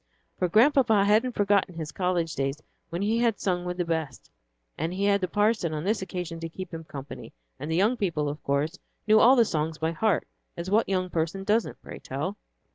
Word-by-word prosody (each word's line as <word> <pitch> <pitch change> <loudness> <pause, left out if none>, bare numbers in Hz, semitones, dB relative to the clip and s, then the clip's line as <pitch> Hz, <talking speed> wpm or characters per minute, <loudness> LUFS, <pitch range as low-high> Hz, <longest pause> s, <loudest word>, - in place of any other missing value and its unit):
For 180 - +1
Grandpapa 225 - +4
hadn't 220 +5 +3
forgotten 200 -4 +1
his 160 -2 -5
college 175 -2 -1
days 135 +2 -2 0.3
when 170 +3 -3
he 220 +3 +1
had 230 -4 +1
sung 180 -2 -1
with 180 0 -3
the 175 - 0
best, 160 -6 -4 0.4
and 160 +3 -2
he 195 +2 -1
had 200 -1 +3
the 185 - 0
parson 205 -4 +1
on 150 - -3
this 210 +3 0
occasion 180 -3 -5
to 165 0 -5
keep 185 +2 -8
him 165 0 -6
company, 140 -4 -9 0.3
and 145 - -5
the 160 - 0
young 210 +7 +3
people, 165 -8 -1
of 145 +1 -5
course, 145 +5 -1 0.3
knew 215 0 +6
all 250 +4 +7
the 235 -3 +5
songs 155 -3 -2
by 160 0 -1
heart, 205 +5 0 0.3
as 170 +2 -5
what 220 +1 +3
young 185 -2 0
person 165 +4 -2
doesn't, 215 +3 0
pray - - -9
tell! - - -4
180 Hz, 210 wpm, -27 LUFS, 160-205 Hz, 0.4 s, all